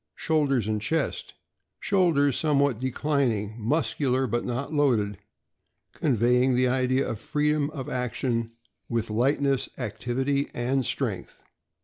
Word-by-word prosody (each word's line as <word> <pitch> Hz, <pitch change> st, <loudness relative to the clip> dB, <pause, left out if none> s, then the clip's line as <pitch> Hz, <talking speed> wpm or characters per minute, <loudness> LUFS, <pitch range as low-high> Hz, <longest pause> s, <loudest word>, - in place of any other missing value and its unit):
Shoulders 140 Hz, -8 st, +1 dB
and 105 Hz, -1 st, -1 dB
chest. 155 Hz, +7 st, -2 dB, 0.2 s
— -, -, -53 dB
Shoulders 160 Hz, -9 st, +2 dB
somewhat 140 Hz, -6 st, +2 dB
declining, 130 Hz, -5 st, 0 dB
muscular, 130 Hz, +1 st, 0 dB
but 120 Hz, 0 st, -1 dB
not 130 Hz, +5 st, -3 dB
loaded, 110 Hz, -9 st, +1 dB, 0.7 s
conveying 125 Hz, 0 st, +2 dB
the 125 Hz, +1 st, +3 dB
idea 130 Hz, +1 st, +1 dB
of 110 Hz, -, -4 dB
freedom 150 Hz, +3 st, 0 dB
of 140 Hz, -3 st, -6 dB
action, 120 Hz, -3 st, -2 dB, 0.4 s
with 115 Hz, -2 st, -1 dB
lightness, 135 Hz, +3 st, +1 dB
activity, 130 Hz, +5 st, -1 dB
and 130 Hz, +2 st, 0 dB
strength. -, -, -4 dB
130 Hz, 115 wpm, -26 LUFS, 120-145 Hz, 0.7 s, the